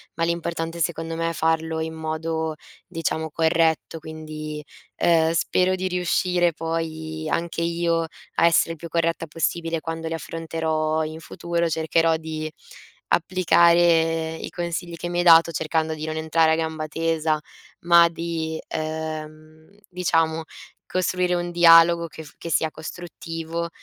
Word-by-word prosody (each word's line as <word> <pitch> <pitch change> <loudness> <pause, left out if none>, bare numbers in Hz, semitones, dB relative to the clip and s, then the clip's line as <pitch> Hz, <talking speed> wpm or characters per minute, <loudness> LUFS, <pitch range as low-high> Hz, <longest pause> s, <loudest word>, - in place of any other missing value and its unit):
ma 165 - -1
l'importante 170 0 -2
secondo 165 0 -2
me 165 0 -1
è - - -3
farlo 160 0 0
in 160 0 -4
modo, 160 0 -3 0.3
diciamo, 165 -2 -2
corretto. 160 0 +1
Quindi, 155 -1 -7 0.3
ehm, 165 -1 +3
spero 185 +2 +2
di 185 0 -2
riuscire 180 -1 +1
poi, 160 -1 -4
anche 170 0 -2
io, 170 0 +1 0.3
a - - +4
essere 165 0 +3
il 165 - -6
più 170 - -8
corretta 165 0 -1
possibile 165 +1 -2
quando 165 0 -4
li 165 - -3
affronterò 160 -1 -2
in 155 +1 -6
futuro, 170 +1 -2
cercherò 160 +1 +2
di 155 -1 -5 0.6
applicare 170 -2 +3
i - - -7
consigli 170 0 -4
che 175 +1 -5
mi 175 - -3
hai - - +2
dato, 165 -1 +7
cercando 160 0 -1
di 155 0 -5
non 155 0 -3
entrare 160 0 +2
a - - +4
gamba 160 -1 -2
tesa, 160 -1 0 0.5
ma 170 0 +7
di, 165 -1 -4
ehm, 155 0 -6 0.2
diciamo 165 -3 +1 0.4
costruire 180 0 0
un 175 0 -1
dialogo 170 0 +6
che 160 0 -10
f 145 - -15
che 170 - -6
sia 160 0 +2
costruttivo, 165 0 -6
165 Hz, 145 wpm, -23 LUFS, 160-170 Hz, 0.6 s, dato